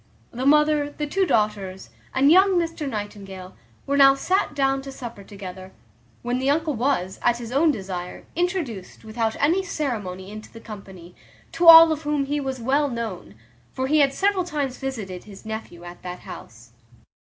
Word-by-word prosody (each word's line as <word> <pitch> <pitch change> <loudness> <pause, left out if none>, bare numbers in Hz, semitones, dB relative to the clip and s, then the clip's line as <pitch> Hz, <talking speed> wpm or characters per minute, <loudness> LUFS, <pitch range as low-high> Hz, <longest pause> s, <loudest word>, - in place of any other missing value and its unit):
The 255 +3 -2
mother, 300 0 +4
the 295 +1 -5
two 375 +6 0
daughters, 205 - -1 0.2
and 275 +3 +4
young 380 +1 +5
Mr 330 -4 -2
Nightingale, 195 -4 -7 0.3
were 280 0 0
now 275 -1 +7
sat 365 +1 0
down 270 -1 +1
to 275 0 -8
supper 235 -6 -9
together, 190 -1 -10 0.5
when 245 +1 -1
the 265 +1 0
uncle 310 +1 +1
was, 235 -7 -1
at 240 0 +2
his 235 -1 -8
own 295 +5 +3
desire, 185 -8 -5
introduced 325 - -3
without 220 0 -2
any 335 +6 +3
ceremony 210 - -4
into 215 0 -10
the 230 - -11
company, 190 -6 -11 0.4
to 340 - 0
all 330 0 +11
of 310 -1 -2
whom 295 -2 -1
he 290 +2 -1
was 265 -2 -4
well 280 +5 +1
known; 225 - -6 0.4
for 260 - -2
he 305 +3 +3
had 280 -2 +4
several 390 +5 +1
times 290 -7 -3
visited 215 -10 -5
his 200 0 -13
nephew 220 -6 -7
at 175 0 -11
that 180 0 -7
house. 115 +1 -12
260 Hz, 175 wpm, -23 LUFS, 200-295 Hz, 0.5 s, all